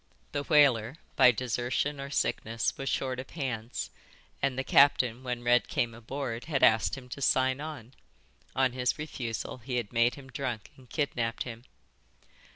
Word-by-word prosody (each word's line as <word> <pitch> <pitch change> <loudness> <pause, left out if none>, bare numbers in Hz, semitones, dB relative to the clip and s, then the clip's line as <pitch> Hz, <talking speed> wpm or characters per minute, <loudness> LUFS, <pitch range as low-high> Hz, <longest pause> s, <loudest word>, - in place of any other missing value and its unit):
The 145 - -1
whaler, 140 -5 +4 0.2
by 125 -2 +8
desertion 125 +4 -1
or 140 - -6
sickness, 115 -4 0
was 135 - -3
short 130 -1 -1
of 130 - -7
hands, 125 -7 -4 0.5
and 135 -2 0
the 130 - 0
captain 130 -4 +4
when 125 -2 -4
Red 120 +1 +4
came 115 -1 0
aboard 120 +1 -5
had 150 -4 -1
asked 110 +4 +4
him 130 -2 -10
to 140 - -7
sign 130 0 +3
on; 145 -6 -7 0.6
on 130 -1 +3
his 125 0 0
refusal 130 -7 -4
he 125 +2 -4
had 120 -2 -2
made 120 +1 +3
him 135 -2 -12
drunk 125 -6 -4
and 130 -2 -18
kidnapped 120 -6 -1
him." 120 -1 -9
125 Hz, 160 wpm, -29 LUFS, 120-135 Hz, 0.6 s, by